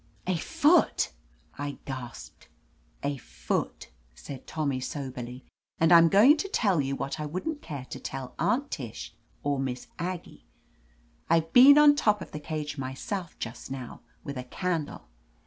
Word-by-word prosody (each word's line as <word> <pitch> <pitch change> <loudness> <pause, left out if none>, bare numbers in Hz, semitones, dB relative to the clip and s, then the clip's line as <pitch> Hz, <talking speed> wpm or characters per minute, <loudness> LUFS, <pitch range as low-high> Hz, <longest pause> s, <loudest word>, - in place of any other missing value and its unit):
"A 185 - +1
foot 320 - +3 0.2
!" - - -32
I 145 0 -4
gasped. 130 -3 -8 0.6
"A 140 0 -1
foot," - - -4 0.2
said 135 - -9
Tommy 140 -4 -1
soberly. 130 -2 -6 0.3
"And 165 +1 +4
I'm 165 -1 +8
going 235 - +7
to 395 - -2
tell 195 - +2
you 135 0 -2
what 140 +3 -4
I 150 - -3
wouldn't 290 - -4
care 140 -5 -6
to - - -5
tell 130 -2 -6
Aunt 250 - +1
Tish 120 -7 -6 0.3
or 145 -1 0
Miss 130 -2 -4
Aggie, 180 0 -5 0.8
I've 165 -1 +2
been 275 +4 +9
on 295 -1 +8
top 210 -8 +2
of 170 - -9
the 150 - -5
cage 150 -1 -4
myself, 145 +8 -5
just 115 +2 -6
now, 130 -3 -7 0.2
with 140 -2 -5
a - - -4
candle. 165 +3 -3
150 Hz, 155 wpm, -28 LUFS, 135-190 Hz, 0.8 s, been